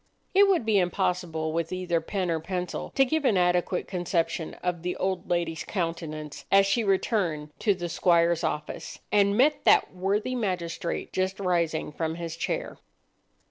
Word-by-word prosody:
It 400 +1 +6
would 365 - +2
be 215 -3 +4
impossible 180 -3 -1
with 165 0 -1
either 180 -2 -1
pen 185 +1 -2
or 165 - 0
pencil 180 +2 -4
to 270 - +5
give 315 +4 0
an 225 -8 +3
adequate 180 0 +1
conception 175 -3 -1
of 180 -2 -1
the 180 +1 -2
old 190 -1 -2
lady's 170 -2 -1
countenance 165 -5 -4
as 195 0 +6
she 210 +4 +1
returned 185 -6 0
to 205 -3 +2
the 175 -1 -4
squire's 170 0 +2
office, 150 0 -4
and 200 0 +3
met 290 +5 +3
that - - +5
worthy 200 +7 0
magistrate 180 -7 -3
just 190 +1 -1
rising 170 -5 0
from 160 +1 -3
his 165 -1 -5
chair. - - -3
180 Hz, 160 wpm, -27 LUFS, 165-195 Hz, -, It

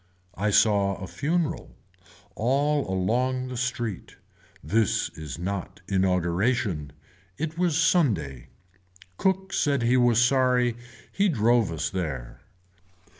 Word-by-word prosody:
I 105 +2 -1
saw 100 -2 +3
a 95 - -7
funeral. 160 - -2 0.6
All 140 +3 0
along 125 +7 0
the 125 - -6
street. 120 -4 -3 0.5
This 105 +7 +1
is 75 -5 -8
not 95 +1 -5
inauguration. 95 - 0 0.5
It 160 +1 -3
was 175 -4 +2
Sunday. 105 - +1 0.7
Cook 190 0 0
said 140 -4 +1
he 120 +2 +3
was 120 -2 +4
sorry 125 -1 +3 0.4
he 200 +1 +2
drove 115 - +2
us 80 -2 -3
there. 75 -10 -5
115 Hz, 110 wpm, -26 LUFS, 95-135 Hz, 0.7 s, was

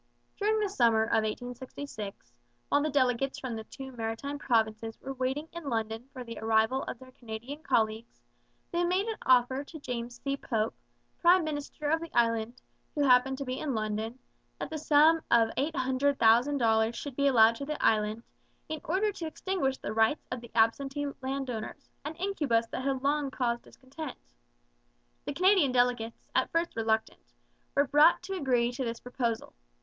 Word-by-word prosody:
During 430 +1 +1
the 420 - +1
summer 230 - +3
of 225 0 +2
1866, 245 -2 -6 0.4
while 285 - +3
the 305 - 0
delegates 270 -1 +1
from 250 -3 -4
the 220 0 -6
two 265 +2 -9
maritime 240 +5 -4
provinces 225 -3 0
were 270 - -6
waiting 265 +4 -2
in 340 -4 -5
London 225 +1 -3
for 255 -2 -7
the 230 -1 -8
arrival 220 +4 +2
of - - -5
their 255 +1 -14
Canadian 240 +5 -8
colleagues, 225 -7 0 0.5
they 345 0 +1
made 365 +3 +1
an 450 -1 -4
offer 260 +2 +4
to 315 +2 -11
James 240 -3 -5
C. 275 0 -1
Pope, 225 -5 -1 0.5
prime 355 +1 +5
minister 295 0 -4
of 325 0 +2
the 335 - -6
Island, 230 0 +1 0.3
who 295 - +2
happened 265 0 +4
to 275 - -4
be 255 0 -3
in 280 -5 -2
London, 215 +2 -2 0.4
that - - -5
the 315 - -3
sum 305 +2 +5
of 230 -1 +5
$800,000 255 -4 +2
should 280 +1 -6
be 280 +1 +2
allowed 230 -3 +6
the 290 +3 -4
Island, 215 +1 +2 0.5
in 315 -1 -4
order 390 +5 +1
to 340 -5 -5
extinguish 315 -5 -1
the 210 - -5
rights 225 +6 +2
of 250 -1 -3
the 235 - -11
absentee 270 +6 +2 0.2
land 265 0 -3
owners, 225 +5 -7
an 305 +3 -5
incubus 300 -12 0
that 255 - -4
had 270 -1 -1
long 285 0 +1
caused 240 -3 -1
discontent. 275 +2 -9 1.1
The - - -3
Canadian 370 -5 +4
delegates, 245 -2 0
at - - +2
first 335 +1 -1
reluctant, 220 -1 0 0.5
were 285 - +4
brought 295 +6 +5
to 385 +2 -5
agree 250 -7 +1
to 250 +2 -4
this 230 -1 -3
proposal. 240 -2 -3
260 Hz, 170 wpm, -30 LUFS, 230-290 Hz, 1.1 s, allowed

